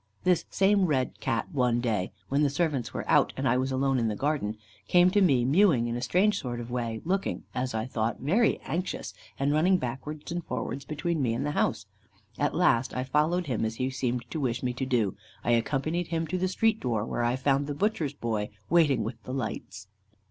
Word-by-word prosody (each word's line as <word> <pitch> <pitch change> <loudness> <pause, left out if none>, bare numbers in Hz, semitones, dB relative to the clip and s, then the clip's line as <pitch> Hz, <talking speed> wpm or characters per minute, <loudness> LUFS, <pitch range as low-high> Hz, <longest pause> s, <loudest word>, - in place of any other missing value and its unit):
This 180 -2 +2
same 195 0 +3
red 130 -5 0
Cat 115 - -1
one 125 -5 +2
day, 110 -6 -1 0.2
when 140 +2 +1
the 145 - +3
servants 145 -4 -1
were - - -5
out, - - +4
and - - 0
I 115 - +3
was 130 +1 0
alone 135 0 +1
in 115 - +1
the 105 - -1
garden, 135 -5 -1 0.3
came 180 0 +5
to 205 +1 +3
me 135 -10 +4
mewing 145 - +4
in 120 0 -2
a 120 - -3
strange 200 +9 +2
sort 120 -2 -4
of 120 0 -7
way, 115 -2 -2
looking, 195 +3 -1
as 125 -2 -2
I 110 0 -1
thought, 115 -3 -2
very 200 - +2
anxious, 180 +3 -3 0.2
and 140 +1 +1
running 180 +5 +4
backwards 150 +3 -5
and 175 0 -3
forwards 125 +2 -4
between 160 +1 -2
me 115 -3 +1
and 135 +4 -2
the 150 - 0
house. - - 0 0.5
At - - +1
last, 120 +2 +3 0.2
following 160 +5 +2
him 125 -9 -2
as 110 0 -1
he 130 +3 -1
seemed 125 -2 -2
to 160 - -3
wish 125 -3 -1
me 125 -1 0
to 130 +2 -3
do, 115 -7 +1 0.3
I 120 - +1
accompanied 145 +8 0
him 165 -1 -1
to 185 - -1
the 185 - +1
street 220 +4 +1
door, 115 -4 -1
where - - -2
I 120 +1 +2
found 140 +1 +1
the 145 - -3
butcher's 160 -6 0
boy 110 -5 -2 0.2
waiting 150 -9 +4
with 115 +1 -6
the 130 +3 -6
lights. 105 -6 -5
135 Hz, 215 wpm, -28 LUFS, 120-165 Hz, 0.5 s, came